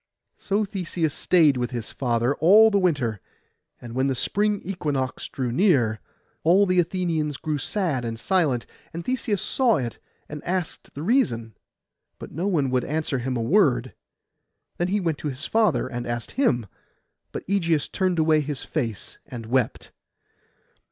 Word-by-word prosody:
So 205 +2 -1
Theseus 175 -5 -2
stayed 155 -7 +4
with 120 -1 -1
his 120 -3 -5
father 120 0 0
all 210 +7 +7
the 200 - +3
winter: 135 - 0 0.6
and 120 -1 -9
when 130 +2 +1
the 135 - 0
spring 205 +9 +1
equinox 145 -8 -3
drew 125 -3 -3
near, 125 - +3 0.4
all 185 +5 +5
the 185 -1 +2
Athenians 165 -4 0
grew 155 -2 -2
sad 165 - -1
and 115 -1 -4
silent, 155 -10 +1 0.3
and 170 +1 -6
Theseus 235 -6 -1
saw 250 -5 +3
it, 120 -5 -4 0.3
and 150 0 -8
asked 180 -1 -3
the 145 - -5
reason; 120 - +1 0.6
but - - -9
no 175 +6 -2
one 145 -9 +1
would 130 -1 +1
answer 150 -3 -1
him 125 +1 -2
a 115 - -1
word. 130 - +2 0.8
Then 175 - 0
he 205 +3 +1
went 165 -5 -1
to - - -4
his 135 +2 -5
father, 220 - +2
and 120 -2 -5
asked 120 0 -4
him: 125 - +1 0.7
but - - -6
Ægeus 170 -6 0
turned 185 -2 0
away 155 -1 +4
his 145 -2 -4
face 115 - -4
and 115 -2 -7
wept. 120 0 -1
155 Hz, 160 wpm, -24 LUFS, 125-185 Hz, 0.8 s, all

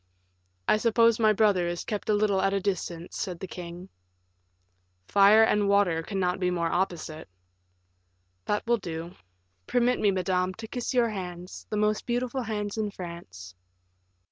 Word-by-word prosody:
"I - - +4
suppose 230 0 +3
my 215 -1 +5
brother 205 -4 +3
is 175 0 -3
kept 210 -1 -4
a 210 - +4
little 205 -2 +2
at 195 +1 +1
a - - +1
distance," 180 -3 -3
said 180 -4 -4
the 190 - -5
king. 180 0 -8 1.2
"Fire 205 - +6
and 210 -2 +2
water 200 -5 +3
cannot 185 0 -1
be 180 -1 +1
more 170 -2 -1
opposite." 170 - -2 1.2
"That 210 - -1
will 235 0 +2
do. 170 -3 -6 0.5
Permit 245 0 +2
me, 210 - +3
madame, 185 -1 0
to 225 +2 -8
kiss 245 +3 -4
your 240 -2 +3
hands, 180 -3 -7
the 210 - -2
most 210 0 0
beautiful 250 +2 -1
hands 210 -2 -3
in 215 -1 -1
France." 170 - -9
195 Hz, 155 wpm, -27 LUFS, 180-215 Hz, 1.2 s, Fire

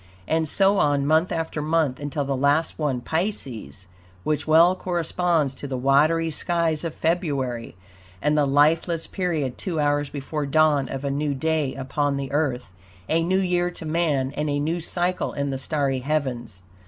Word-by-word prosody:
And 160 -1 +1
so 195 +3 +3
on 145 -1 +2
month 160 +4 +3
after 160 -2 -2
month, 155 -4 +1
until 145 0 -3
the 135 0 -1
last 145 +5 +1
one, 140 -5 -1
Pisces, 130 - -3 0.4
which 155 0 -1
well 165 +4 +6
corresponds 175 -4 0
to 140 +2 -7
the 130 -2 -3
watery 155 +5 +3
skies 165 0 0
of 165 -2 -4
February 140 - -1 0.4
and 150 +5 +1
the 150 -2 +3
lifeless 160 +4 +2
period 160 -9 -2
two 170 -5 -2
hours 145 -1 +1
before 145 +1 -4
dawn 145 -2 +3
of 135 0 -5
a 140 - -1
new 145 0 -1
day 155 -1 0
upon 140 +2 -1
the 140 -1 -4
Earth, 130 -7 -1 0.4
a 165 +1 +2
new 180 +3 +1
year 180 -2 +1
to 175 -2 -9
man 155 -5 0
and 150 0 -1
a 145 - 0
new 160 +4 -1
cycle 175 +2 -1
in 140 0 -2
the 135 - -3
starry 140 -2 -1
heavens. 125 -8 -3
150 Hz, 170 wpm, -24 LUFS, 140-165 Hz, 0.4 s, well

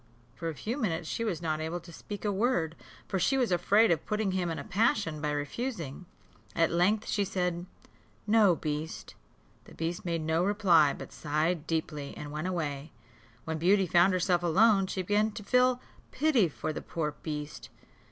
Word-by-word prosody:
For 165 +5 -4
a 160 - -5
few 230 - -4
minutes 170 - -1
she 230 - -2
was 180 -7 -2
not 155 -1 -1
able 160 +2 -3
to 170 0 -14
speak 205 +5 -7
a 205 - +2
word, 190 -6 0 0.3
for 190 - -1
she 270 +9 +2
was 250 -6 +1
afraid 205 +5 +4
of 165 - +1
putting 210 -2 0
him 185 -2 -1
in 165 - -3
a 140 - -5
passion, 190 -6 +1
by 150 - -1
refusing. 165 - -4 0.5
At 165 - +3
length 200 +6 +2
she 205 - +1
said, 180 -2 -2 0.6
"No, 210 -4 +5
beast." 155 0 -4 0.5
The - - -14
beast 165 +2 -3
made 170 -2 -1
no 160 +2 +1
reply, 180 -7 +4
but - - -9
sighed 155 +2 -1
deeply, 155 -3 -3
and 145 -1 -7
went 155 +4 -3
away. 150 -5 -3 0.5
When 160 0 -3
Beauty 190 +4 +4
found 175 +2 +4
herself 180 -1 +2
alone, 195 +3 +4
she 185 0 -3
began 210 +3 +1
to 210 - -7
feel 250 +3 +3 0.3
pity 260 - +2
for 155 +1 -4
the - - -5
poor 155 -3 -3
beast. 150 -1 -6
175 Hz, 180 wpm, -29 LUFS, 160-205 Hz, 0.6 s, No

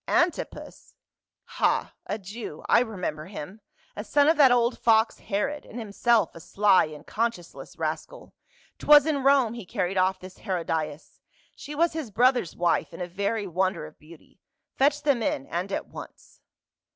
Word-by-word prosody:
" - - -50 0.2
Antipas? 345 - -9 0.5
Ha, - - 0
a 205 - -2
Jew, 205 -5 -8
I - - +5
remember 180 -10 -3
him; 195 +2 -9 0.3
a 205 - -5
son 285 +6 +3
of 320 - +5
that 275 -4 +7
old 240 0 +2
fox 225 0 +3
Herod, 210 +9 -2
and 230 - -11
himself 220 -2 +1
a - - -11
sly 200 +3 +3
and 155 -1 -11
conscience 225 -7 -3
less - - -12
rascal. - - -5 0.5
'Twas 295 -1 +7
in 300 -3 0
Rome 270 -4 +4
he 235 -2 -7
carried 185 +1 -2
off 185 0 +1
this 185 +1 -12
Hero 185 -5 -3
dias; 155 -2 -4 0.4
she 295 - -8
was 335 +2 +2
his 315 -7 -5
brother's 245 -3 +2
wife 170 -3 0
and 165 - -8
a - - -5
very 200 +4 -2
wonder 185 -2 -1
of 155 - -14
beauty. 155 +2 -17 0.4
Fetch 290 +2 +2
them 280 -5 +2
in 135 -10 -1
and 180 +4 -4
at - - -2
once." - - -12
205 Hz, 175 wpm, -26 LUFS, 180-250 Hz, 0.5 s, that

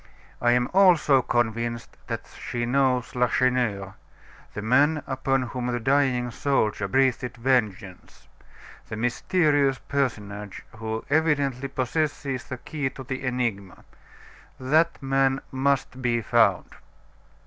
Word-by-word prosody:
I 120 0 +4
am 125 0 +2
also 175 -8 +5
convinced 120 0 -2
that - - -4
she 120 -1 -5
knows 130 -1 +1
Lacheneur 125 -6 +1 0.6
the 105 - -4
man 145 +6 +3
upon 135 0 0
whom 125 0 -4
the 120 -1 -1
dying 130 -1 +1
soldier 110 -6 0
breathed 125 +1 +1
vengeance 110 -7 -2 0.6
the - - -4
mysterious 140 +4 +1
personage 105 -8 -3
who 110 0 -4
evidently 145 -4 +1
possesses 135 0 -2
the 130 - -6
key 140 +1 -3
to 130 - -10
the 130 +1 -5
enigma. 120 -7 -3 0.7
That 155 +5 +1
man 135 0 +2
must 135 -1 -1
be 120 -2 +1
found." 105 -4 +2
125 Hz, 115 wpm, -25 LUFS, 120-135 Hz, 0.7 s, also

